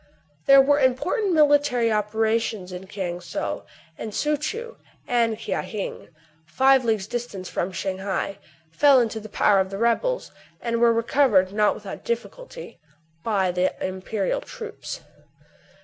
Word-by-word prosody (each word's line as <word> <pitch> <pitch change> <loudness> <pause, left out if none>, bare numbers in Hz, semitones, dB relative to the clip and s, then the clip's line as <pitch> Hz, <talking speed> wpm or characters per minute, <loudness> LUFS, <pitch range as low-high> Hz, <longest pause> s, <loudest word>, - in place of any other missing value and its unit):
There 275 0 +8
were 285 +1 +3
important 290 - +1
military 290 -6 +4
operations 220 -2 0
in 180 +1 -8
Kiang 185 -3 -4
Sou; 175 - -4 0.4
and 215 -2 -6
Soo 300 0 +1
Choo 455 - -5 0.3
and 230 -2 +1
Kia 225 - -2
Hing, 210 -3 -6 0.4
five 265 +9 +4
leagues 220 -4 0
distant 210 -4 -5
from 180 - -2
Shang 190 0 -3
hai, 195 0 -3 0.3
fell 280 - +5
into 225 -2 -1
the 215 0 -10
power 200 0 +3
of 190 0 0
the 195 - -5
rebels, 235 - 0 0.3
and 230 -1 -1
were 235 -1 +6
recovered, 230 -5 +3
not 210 0 +3
without - - -8
difficulty, - - -6 0.4
by 195 -5 +1
the 180 +1 0
imperial 190 - -2
troops. 485 +1 -8
230 Hz, 140 wpm, -24 LUFS, 195-285 Hz, 0.4 s, There